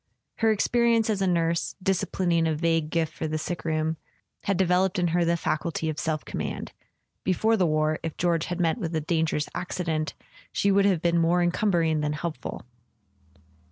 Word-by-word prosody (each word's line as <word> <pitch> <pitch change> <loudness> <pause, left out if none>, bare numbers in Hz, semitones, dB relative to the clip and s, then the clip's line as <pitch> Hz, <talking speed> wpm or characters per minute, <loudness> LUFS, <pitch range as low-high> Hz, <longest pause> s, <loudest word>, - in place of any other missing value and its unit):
Her 225 -1 +3
experience 230 +1 +2
as 200 -2 -1
a 190 - +2
nurse, 170 -1 0
disciplining 180 -3 +1
a 160 - +1
vague 165 -1 +1
gift 160 -1 0
for 160 - -3
the 155 0 -2
sickroom, 160 -1 -2 0.5
had 200 -2 +1
devel¬ 185 0 +3
oped 190 +2 -7
in 175 -1 +2
her 175 +1 +2
the 170 0 +2
faculty 160 0 -1
of 155 - -3
self 155 -2 -2
command: - - -4 0.5
before 220 +5 +2
the 185 -5 +2
war, 155 0 +1
if 165 -2 -5
George 170 -2 +1
had 175 0 -4
met 170 +5 +1
with 165 -5 -3
a 160 - 0
dangerous 160 -1 0
accident, 165 -4 -2 0.4
she 200 - +2
would 200 0 +4
have 185 -5 +2
been 170 0 +3
more 170 +2 +3
encumbering 175 -3 +2
than 150 0 -1
helpful. 150 -4 -5
170 Hz, 180 wpm, -26 LUFS, 160-185 Hz, 0.5 s, would